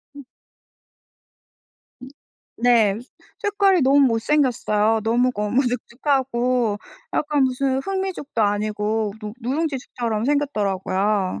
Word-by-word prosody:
음. 285 -2 -11 1.8
음 255 - -9 0.5
네. 230 -4 +3 0.4
색깔이 400 -4 +2
너무 270 +2 +4
못 235 -5 +3
생겼어요. 225 -6 +1
너무 240 +3 +2
거무죽죽하고 245 0 0 0.3
약간 295 -1 +1
무슨 260 +1 0
흑미죽도 380 -8 -3
아니고 210 +1 -1
누 210 -1 -6
누룽지죽처럼 250 -5 -2
생겼더라고요. 205 -8 0
245 Hz, 235 characters per minute, -22 LUFS, 215-280 Hz, 1.8 s, 너무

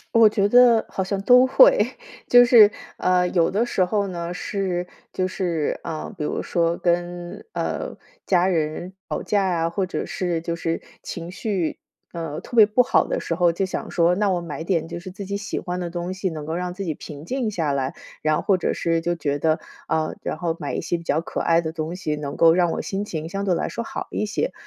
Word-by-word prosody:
我 225 -1 +8
觉 205 -1 +2
得 245 -2 +6
好 190 - -3
像 195 +1 -2
都 250 +4 +6
会， - - +6 0.4
就 245 0 +8
是， 230 -4 +8 0.3
呃， 180 0 +2
有 170 -3 +2
的 220 +5 +1
时 185 -6 +1
候 200 +1 0
呢 170 -1 -4
是 180 -2 -2 0.3
就 185 - 0
是， 175 -5 -2
啊， 160 -2 -5
比 150 - -2
如 - - -2
说 170 -1 +1
跟， 175 0 -2
呃， - - -3 0.3
家 180 -1 +3
人 170 0 -1 0.2
吵 - - -3
架 200 -2 +1
呀， 165 -1 0
或 190 +2 -1
者 180 - -4
是， 175 -3 -2
就 170 0 -3
是 165 0 -2 0.2
情 170 0 -6
绪， 190 -4 -2 0.3
呃， 165 -3 -5
特 240 - -7
别 215 - +10
不 215 +4 +3
好 265 - +2
的 - - -2
时 165 - -2
候， 175 -1 +3
就 190 +3 0
想 185 - -5
说， 170 0 +3
那 205 0 +1
我 180 -2 0
买 160 -1 -6
点， 170 -4 0
就 170 0 -5
是 185 - -9
自 200 +2 -7
己 200 +1 -3
喜 205 +1 -4
欢 180 0 -4
的 175 - -3
东 175 +1 -4
西， 190 0 -2
能 155 -2 -6
够 160 +1 -3
让 180 0 -3
自 195 +1 -5
己 160 -4 -2
平 145 0 -10
静 250 +3 -2
下 165 -8 -1
来， 135 -1 -1 0.3
然 155 0 +2
后 - - -1
或 195 -2 +2
者 - - -1
是 165 -1 0
就 175 +1 -1
觉 145 -3 -2
得， 160 +1 +2 0.3
啊， 155 -1 0
然 - - -2
后 170 -2 -2
买 145 - -4
一 - - -2
些 175 - -1
比 170 - -10
较 155 0 0
可 - - -5
爱 165 0 +3
的 160 -1 -4
东 160 +1 -4
西， 155 -5 -3
能 145 -1 -5
够 165 -1 +6
让 175 -1 +2
我 - - -2
心 200 +1 -3
情 160 -3 -5
相 195 +2 -3
对 180 -3 +2
来 - - -2
说 235 - -4
好 - - -5
一 - - -1
些。 230 - -1
175 Hz, 250 characters per minute, -23 LUFS, 165-195 Hz, 0.4 s, 别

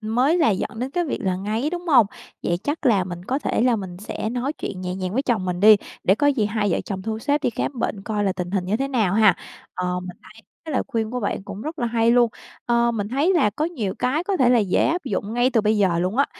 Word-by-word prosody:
mới 250 +10 +2
là 310 -8 +4
dẫn 205 +2 -3
đến 255 +2 -3
cái 350 +3 0
việc 290 - -3
là 185 -1 0
ngáy, 220 - -2
đúng 350 0 -5
hông? 255 -9 +6 0.4
Vậy 175 - 0
chắc 290 0 -2
là 200 -6 +4
mình 175 0 -7
có 260 +5 -1
thể 290 - -1
là 245 -1 +3
mình 185 -4 -6
sẽ 215 +1 -4
nói 250 +4 -2
chuyện 190 -10 -6
nhẹ 180 0 -3
nhàng 185 0 -4
với 265 +4 0
chồng 225 -8 0
mình 180 0 -2
đi, 215 +1 +8 0.3
để 190 - +5
có 290 +7 +1
gì 265 -8 +2
hai 210 -1 -1
vợ - - 0
chồng 190 -2 -5
thu 220 +2 -3
xếp 290 +4 0
đi - - +1
khám 245 +3 -3
bệnh 205 -3 -2
coi 210 0 -2
là 190 - +1
tình 180 -1 -5
hình 190 -2 -1
như 195 +4 0
thế 270 +3 -2
nào 220 -9 +1
ha. 215 -4 +5 0.4
Ờ, 180 0 -2
mình 180 0 -8
thấy 190 - -16 0.3
cái 315 - -5
lời 255 - +1
khuyên 220 -1 -2
của 250 0 -3
bạn 200 - -2
cũng 200 +2 -8
rất 315 +1 -6
là 240 - 0
hay 230 0 +2
luôn. 240 -1 +4 0.4
Ờ, 235 0 +3
mình 210 -3 -3
thấy 285 +9 +2
là 270 -11 +3
có 300 +9 -2
nhiều 240 - -3
cái 295 +7 0
có 395 -1 0
thể 255 -3 +4
là 245 - +5
dễ 200 -4 +2
áp 345 0 -1
dụng 210 -1 -3
ngay 245 +2 +3
từ 235 -4 +3
bây 215 +1 +2
giờ 180 -4 +2
luôn 185 +6 -1
á. 280 - +3
225 Hz, 285 wpm, -23 LUFS, 195-265 Hz, 0.4 s, đi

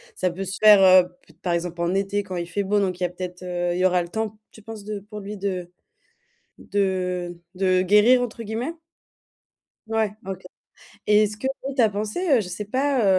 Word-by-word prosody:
ça 185 - 0
peut 190 +3 -5
se 195 +2 -5
faire, 210 -2 +8
heu, 185 -1 +7
peut 165 - -22
être 165 - -38
par 175 -2 -1
exemple, 170 0 -3
en 170 +1 0
été 200 +1 0
quand 190 -2 -6
il 170 -1 -3
fait 200 +4 -1
beau, 205 +2 +1
donc 185 -3 -1
il 180 - -2
y 175 - -1
peut-être, 180 0 -7
heu, 175 -1 -2
il - - -2
y 185 - +3
aura 180 -1 +3
le 170 - -6
temps, 220 +1 -3
tu 220 - -15
penses, 220 -1 -9
de 210 0 -5
pour 210 +1 -9
lui 205 +1 -7
de 185 -3 -3 0.9
de 180 -3 -2
de 185 0 +2
«guérir» 210 +6 +5
entre 240 -1 -4
guillemets? 230 +9 -4 1.1
Ouais, 220 -2 0
OK 190 -1 -5 0.7
et 210 0 +5
ce 210 0 -6
que 240 - -5 0.3
tu 255 - +4
as 220 - +4
pensé, 220 - +1
je 185 - -5
sais 180 +4 -5
pas, 260 +3 +1
195 Hz, 215 wpm, -24 LUFS, 180-215 Hz, 1.1 s, faire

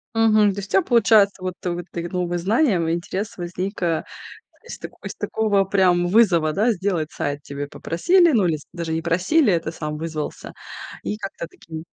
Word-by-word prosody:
Мгм. 215 -2 +4
То 200 - -5
есть 200 - -7
у - - -17
тя - - +5
получается, 215 - +4
вот 185 -1 -4
ты 180 -2 -3
вот 175 0 -4
ты 170 - -4
г 170 - -5
новым 180 -1 -1
и - - +1
знаниям, 195 - +2
и 165 - +1
интерес 190 +5 -4
возник, 180 +3 -5
э, 165 -2 0 0.6
из - - -8
тако - - -9
из - - -6
такого 210 -3 +1
прям 180 -3 +2
вызова, 175 -7 +3
да, 220 +5 +2
сделать 180 -6 -2
сайт 145 0 -3
тебя 140 0 -6
попросили. 345 - +3
Ну, 215 -7 +3
или 160 -2 0
с 145 - -16
даже 170 -2 -4
не 160 - -1
просили, 185 - +2
а 170 - +3
ты 160 - -5
сам 150 -2 -5
вызвался. 155 -1 -5 0.5
И 210 - -3
как-то 195 -5 -6
таким 160 -1 -10
180 Hz, 210 wpm, -22 LUFS, 165-210 Hz, 0.6 s, тя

